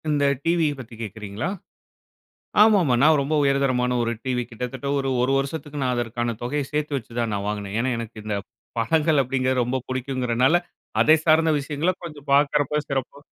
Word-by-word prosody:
இந்த 145 Hz, -1 st, +2 dB, 0.2 s
டிவிய 165 Hz, -3 st, +2 dB
பத்தி 120 Hz, -2 st, -10 dB
கேட்குறீங்களா? 105 Hz, -, -5 dB, 1.1 s
ஆமாமா, 195 Hz, -, +5 dB
நான் 155 Hz, 0 st, +6 dB
ரொம்ப 145 Hz, +3 st, -1 dB
உயர்தரமான 130 Hz, -3 st, +2 dB
ஒரு 115 Hz, 0 st, 0 dB
டிவி 125 Hz, -2 st, 0 dB
கிட்டத்தட்ட 125 Hz, +3 st, -5 dB
ஒரு 135 Hz, -1 st, -1 dB
1 130 Hz, +2 st, +2 dB
வருசத்துக்கு 145 Hz, +1 st, -4 dB
நான் 125 Hz, -1 st, +1 dB
அதற்கான 120 Hz, 0 st, -2 dB
தொகைய 145 Hz, +5 st, -1 dB
சேத்து 150 Hz, -1 st, -2 dB
வெச்சு 120 Hz, -3 st, -7 dB
தான் 115 Hz, -2 st, -1 dB
நான் 100 Hz, 0 st, -3 dB
வாங்குனேன். 105 Hz, -1 st, -4 dB
ஏன்னா 130 Hz, +2 st, 0 dB
எனக்கு 115 Hz, -1 st, -7 dB
இந்த 105 Hz, -1 st, -2 dB, 0.4 s
படங்கள் 155 Hz, +5 st, +2 dB
அப்டிங்குறது 130 Hz, 0 st, +1 dB
ரொம்ப 125 Hz, +2 st, -1 dB
புடிக்குங்குறனால, 130 Hz, +2 st, +1 dB, 0.5 s
அதை 155 Hz, -, +6 dB
சார்ந்த 160 Hz, 0 st, +5 dB
விஷயங்கள 145 Hz, +5 st, -1 dB
கொஞ்சம் 150 Hz, -4 st, -9 dB
பார்க்குறப்பா 145 Hz, 0 st, +2 dB
சிறப்பா 135 Hz, -1 st, -3 dB
135 Hz, 160 wpm, -24 LUFS, 120-150 Hz, 1.1 s, நான்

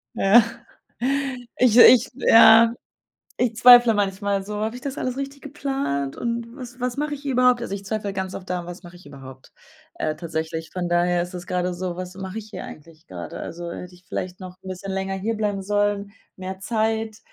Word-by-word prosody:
Ja. 210 Hz, +4 st, +6 dB, 1.1 s
Ich, 245 Hz, -2 st, +4 dB
ich 245 Hz, 0 st, +8 dB
ja. 230 Hz, -2 st, +7 dB, 0.7 s
Ich 240 Hz, -2 st, +1 dB
zweifle 245 Hz, -1 st, +8 dB
manchmal 200 Hz, 0 st, -1 dB
so: 210 Hz, +1 st, -6 dB
„Habe 220 Hz, +2 st, -2 dB
ich -, -, -10 dB
das 280 Hz, +1 st, -5 dB
alles 255 Hz, 0 st, -3 dB
richtig 275 Hz, 0 st, -6 dB
geplant, 270 Hz, -, -3 dB
und 235 Hz, 0 st, -3 dB
was 250 Hz, -1 st, -10 dB
was 250 Hz, +1 st, -2 dB
mache 295 Hz, +1 st, -2 dB
ich 285 Hz, -, -9 dB
hier 280 Hz, -2 st, -2 dB
überhaupt?“ 250 Hz, -1 st, +4 dB
Also, 200 Hz, -4 st, -4 dB
ich 200 Hz, 0 st, -7 dB
zweifle 205 Hz, -1 st, -3 dB
ganz 190 Hz, -1 st, -4 dB
oft 185 Hz, -, -8 dB
daran: 180 Hz, -1 st, -3 dB
„Was 175 Hz, +1 st, -9 dB
mache 175 Hz, 0 st, -13 dB
ich 175 Hz, -, -17 dB
überhaupt?” 135 Hz, -2 st, -13 dB, 0.4 s
Äh, 155 Hz, -, -2 dB
tatsächlich. 160 Hz, -1 st, -5 dB
Von 180 Hz, -2 st, -3 dB
daher 175 Hz, 0 st, +2 dB
ist 180 Hz, +1 st, -8 dB
es 175 Hz, 0 st, -7 dB
gerade 180 Hz, 0 st, -1 dB
so: 175 Hz, -1 st, -4 dB
„Was 185 Hz, 0 st, -7 dB
mache 190 Hz, +2 st, -6 dB
ich 215 Hz, 0 st, -9 dB
hier -, -, -7 dB
eigentlich 160 Hz, +1 st, -13 dB
gerade?” 90 Hz, -2 st, -8 dB
Also, 170 Hz, 0 st, -7 dB
hätte 180 Hz, +1 st, -8 dB
ich 180 Hz, 0 st, -20 dB
vielleicht 180 Hz, +1 st, -5 dB
noch 185 Hz, -1 st, -9 dB
'n 190 Hz, -, -10 dB
bisschen 185 Hz, +1 st, -6 dB
länger 195 Hz, 0 st, -2 dB
hierbleiben 210 Hz, -1 st, -2 dB
sollen, 205 Hz, 0 st, -1 dB, 0.2 s
mehr 190 Hz, 0 st, -7 dB
Zeit 220 Hz, +1 st, -1 dB
195 Hz, 195 wpm, -23 LUFS, 180-235 Hz, 1.1 s, ich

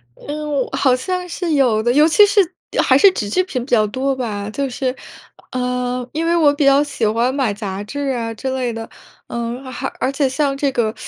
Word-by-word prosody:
嗯， 295 Hz, -2 st, -3 dB
好 260 Hz, -2 st, +3 dB
像 360 Hz, +8 st, -3 dB
是 335 Hz, -1 st, -2 dB
有 245 Hz, -7 st, +3 dB
的， 240 Hz, -, +2 dB
尤 300 Hz, +2 st, +5 dB
其 415 Hz, +6 st, +6 dB
是 410 Hz, 0 st, +2 dB, 0.4 s
还 -, -, +4 dB
是 395 Hz, -3 st, +7 dB
纸 205 Hz, -, -4 dB
质 370 Hz, -, +2 dB
品 265 Hz, -10 st, -4 dB
比 -, -, -15 dB
较 220 Hz, -3 st, +4 dB
多 265 Hz, +5 st, -1 dB
吧。 215 Hz, -5 st, -4 dB
就 275 Hz, +5 st, -2 dB
是， 255 Hz, +1 st, -2 dB, 0.6 s
呃， 250 Hz, 0 st, -2 dB
因 320 Hz, +2 st, -2 dB
为 340 Hz, +1 st, +2 dB
我 310 Hz, -4 st, +5 dB
比 290 Hz, 0 st, 0 dB
较 275 Hz, +1 st, +5 dB
喜 285 Hz, -6 st, -2 dB
欢 230 Hz, +4 st, +1 dB
买 265 Hz, -7 st, 0 dB
杂 200 Hz, -2 st, -5 dB
志 280 Hz, +6 st, -4 dB
啊 230 Hz, -1 st, -3 dB
之 260 Hz, +4 st, -4 dB
类 245 Hz, -3 st, -2 dB
的。 225 Hz, 0 st, -7 dB, 0.4 s
嗯， 235 Hz, +2 st, -4 dB
而 255 Hz, -1 st, -5 dB
而 265 Hz, -, 0 dB
且 275 Hz, 0 st, +1 dB
像 275 Hz, +1 st, 0 dB
这 280 Hz, -1 st, 0 dB
个， 225 Hz, -4 st, 0 dB
260 Hz, 230 characters per minute, -19 LUFS, 235-290 Hz, 0.6 s, 是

